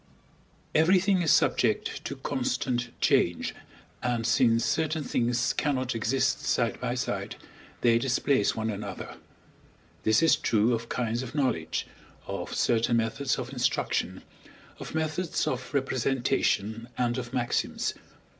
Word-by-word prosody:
Everything 185 Hz, +4 st, +4 dB
is 165 Hz, -, +1 dB
subject -, -, +2 dB
to -, -, -3 dB
constant 125 Hz, -1 st, -1 dB
change, 85 Hz, -, +2 dB, 0.5 s
and 120 Hz, -2 st, -1 dB
since 115 Hz, -1 st, +3 dB
certain 155 Hz, +1 st, 0 dB
things 120 Hz, 0 st, +1 dB
cannot 130 Hz, -4 st, 0 dB
exist 125 Hz, +3 st, +1 dB
side -, -, 0 dB
by -, -, -1 dB
side, -, -, -3 dB, 0.5 s
they 115 Hz, -1 st, +4 dB
displace 130 Hz, -2 st, +1 dB
one 110 Hz, 0 st, -1 dB
another 100 Hz, -2 st, -6 dB, 0.8 s
This 110 Hz, +6 st, +3 dB
is 165 Hz, -, +6 dB
true 110 Hz, +2 st, +2 dB
of 115 Hz, 0 st, -3 dB
kinds 120 Hz, -1 st, -1 dB
of 130 Hz, +2 st, -7 dB
knowledge, 130 Hz, -, 0 dB, 0.4 s
of -, -, -5 dB
certain 120 Hz, 0 st, +2 dB
methods 115 Hz, +4 st, 0 dB
of 125 Hz, +2 st, -5 dB
instruction, 125 Hz, -2 st, -1 dB, 0.6 s
of -, -, -7 dB
methods 160 Hz, +2 st, -1 dB
of 125 Hz, -1 st, -3 dB
representation, 125 Hz, -4 st, 0 dB
and 120 Hz, 0 st, 0 dB
of 120 Hz, -1 st, -6 dB
maxims. 120 Hz, -1 st, -1 dB
125 Hz, 125 wpm, -28 LUFS, 115-135 Hz, 0.8 s, is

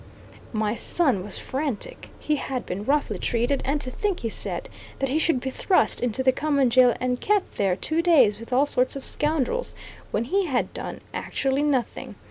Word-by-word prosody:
My 215 Hz, -2 st, 0 dB
son 255 Hz, -, +1 dB
was 200 Hz, 0 st, -7 dB
frantic; 285 Hz, -, -4 dB
he 305 Hz, -1 st, -1 dB
had 265 Hz, -2 st, -4 dB
been 200 Hz, +3 st, -4 dB
roughly 290 Hz, +3 st, +1 dB
treated; 245 Hz, +3 st, 0 dB
and 285 Hz, +2 st, 0 dB
to 255 Hz, -, -4 dB
think, 400 Hz, +5 st, -2 dB
he 230 Hz, -, -2 dB
said, -, -, -3 dB, 0.3 s
that 270 Hz, -, -1 dB
he 295 Hz, +4 st, +1 dB
should 320 Hz, -5 st, +2 dB
be 265 Hz, +1 st, -4 dB
thrust 370 Hz, +7 st, +2 dB
into 245 Hz, +1 st, 0 dB
the 260 Hz, -, +5 dB
common 280 Hz, -3 st, +1 dB
jail 250 Hz, -1 st, +6 dB
and 250 Hz, 0 st, -1 dB
kept 415 Hz, -2 st, 0 dB
there 195 Hz, -3 st, +2 dB
two 315 Hz, -, 0 dB
days 265 Hz, -, +4 dB
with 230 Hz, +2 st, -11 dB
all 265 Hz, +3 st, +4 dB
sorts 255 Hz, -2 st, +1 dB
of 275 Hz, -, -5 dB
scoundrels, 310 Hz, -, -1 dB, 0.3 s
when 215 Hz, -, 0 dB
he 380 Hz, +9 st, 0 dB
had 260 Hz, -5 st, -1 dB
done -, -, -6 dB
actually 270 Hz, +1 st, -1 dB
nothing! 280 Hz, -5 st, -1 dB
265 Hz, 190 wpm, -25 LUFS, 240-305 Hz, 0.3 s, jail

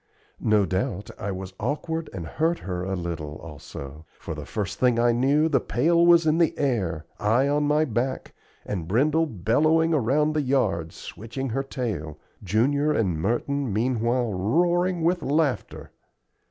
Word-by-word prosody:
No 105 Hz, -2 st, +3 dB
doubt 100 Hz, +1 st, -2 dB
I 100 Hz, -, -3 dB
was 95 Hz, 0 st, -6 dB
awkward 155 Hz, +7 st, -3 dB
and 90 Hz, -4 st, -6 dB
hurt 165 Hz, -, 0 dB
her 90 Hz, -2 st, -4 dB
a 95 Hz, +1 st, -2 dB
little, 85 Hz, -4 st, -5 dB
also; 75 Hz, -1 st, -10 dB
for -, -, -6 dB
the 75 Hz, -2 st, -8 dB
first 105 Hz, -1 st, -4 dB
thing 125 Hz, -2 st, +3 dB
I 120 Hz, 0 st, +4 dB
knew 140 Hz, +6 st, +3 dB
the 140 Hz, -4 st, +2 dB
pail 165 Hz, +10 st, +2 dB
was 170 Hz, -1 st, +6 dB
in 155 Hz, +1 st, +3 dB
the 165 Hz, -3 st, +2 dB
air, 95 Hz, -, -1 dB
I 115 Hz, +6 st, +2 dB
on 145 Hz, +1 st, +1 dB
my 150 Hz, +1 st, +3 dB
back, 130 Hz, +1 st, -2 dB, 0.3 s
and 90 Hz, -6 st, -4 dB
Brindle 150 Hz, -, +2 dB
bellowing 155 Hz, -, +2 dB
around 150 Hz, +3 st, +2 dB
the 155 Hz, -, +1 dB
yard, 125 Hz, -, 0 dB
switching 120 Hz, +5 st, -6 dB
her 130 Hz, +4 st, -1 dB
tail, 105 Hz, -, -4 dB, 0.3 s
Junior 135 Hz, -, +2 dB
and 100 Hz, -, +1 dB
Merton 125 Hz, -, -1 dB
meanwhile 120 Hz, +1 st, 0 dB
roaring 175 Hz, -, +1 dB
with 175 Hz, +2 st, +2 dB
laughter. 145 Hz, -2 st, -1 dB
125 Hz, 155 wpm, -25 LUFS, 95-150 Hz, 0.3 s, was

